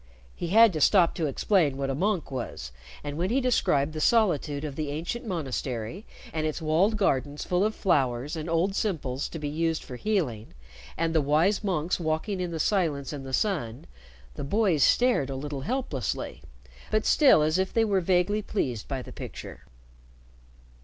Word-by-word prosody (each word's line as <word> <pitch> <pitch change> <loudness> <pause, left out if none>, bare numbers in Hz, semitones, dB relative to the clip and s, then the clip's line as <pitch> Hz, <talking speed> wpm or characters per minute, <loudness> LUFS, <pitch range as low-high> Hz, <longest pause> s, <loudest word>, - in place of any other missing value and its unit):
He 175 - -4
had 220 +3 +6
to 155 - -2
stop 175 +1 +5
to 160 - -1
explain 150 -1 +1
what 135 0 -1
a - - -1
monk 180 +1 -1
was, 120 - -5 0.3
and 145 +1 -5
when 180 +2 0
he 250 +5 +2
described 180 - +1
the 155 - -4
solitude 155 - +2
of 145 -3 -5
the 150 -1 -3
ancient 170 +11 -4
monastery, 135 - -4 0.3
and 155 -1 -1
its 155 - -3
walled 170 +7 +2
gardens 145 -6 0
full 180 +1 +1
of 215 +1 0
flowers 140 - 0
and 160 +1 -5
old 170 +4 +1
simples 145 - -2
to - - -6
be 150 -2 -4
used 160 +2 -1
for 125 - -8
healing, 130 - -2 0.4
and 165 0 0
the 160 - +3
wise 160 +9 +2
monks 180 -4 -1
walking 165 +5 -2
in 180 - -2
the 165 -1 -4
silence 155 -7 0
and 140 -2 -6
the - - -6
sun, 130 - -1 0.5
the - - -6
boys 185 -1 +1
stared 245 - +3
a 135 - -4
little 140 0 -5
helplessly, 160 - -3 0.5
but 215 0 +1
still 270 - +5
as 155 +4 +1
if 190 0 0
they 225 -1 +2
were 200 -3 +1
vaguely 180 +4 +1
pleased 125 - -3
by 135 -2 -3
the - - -11
picture. - - -9
160 Hz, 180 wpm, -27 LUFS, 140-195 Hz, 0.5 s, had